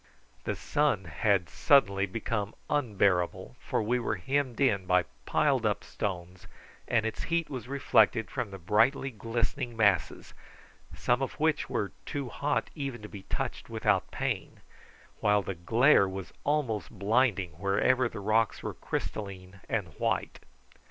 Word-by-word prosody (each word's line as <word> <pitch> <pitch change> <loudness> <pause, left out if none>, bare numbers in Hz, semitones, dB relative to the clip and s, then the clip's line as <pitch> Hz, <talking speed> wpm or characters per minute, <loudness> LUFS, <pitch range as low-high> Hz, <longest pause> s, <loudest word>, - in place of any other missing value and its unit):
The - - -1
sun 145 -10 +1
had 90 +3 +1
suddenly 100 -8 +3
become 105 0 -3 0.2
unbearable, 100 -10 +1
for - - -1
we 120 +4 +1
were 120 - -1
hemmed 135 -3 -1
in 100 -9 +2
by 90 0 +4 0.2
piled - - +2
up - - 0
stones, 90 -2 -5 0.4
and 110 -2 +2
its 110 - -3
heat 170 -2 -1
was 125 -4 -5
reflected 110 -5 +3
from 125 -5 -2
the 95 - -8
brightly 110 +9 +2
glistening 115 +2 -2
masses, 105 -4 +1 0.6
some 125 - +1
of 135 - -2
which 155 -1 +1
were 100 - -1 0.2
too 140 -4 -3
hot 145 +3 -1
even 135 -7 -5
to 105 - -8
be 100 - -9
touched - - -3
without - - +1
pain, - - -3 0.6
while 105 -1 +3
the 95 - -3
glare 100 - +4
was 95 -3 -7
almost 130 -9 0
blinding 105 -2 +1
wherever 120 +6 +2
the 100 - -7
rocks 110 +2 +1
were - - -3
crystalline 95 -2 -5
and 100 -6 -1
white. - - -1
110 Hz, 145 wpm, -29 LUFS, 100-130 Hz, 0.6 s, by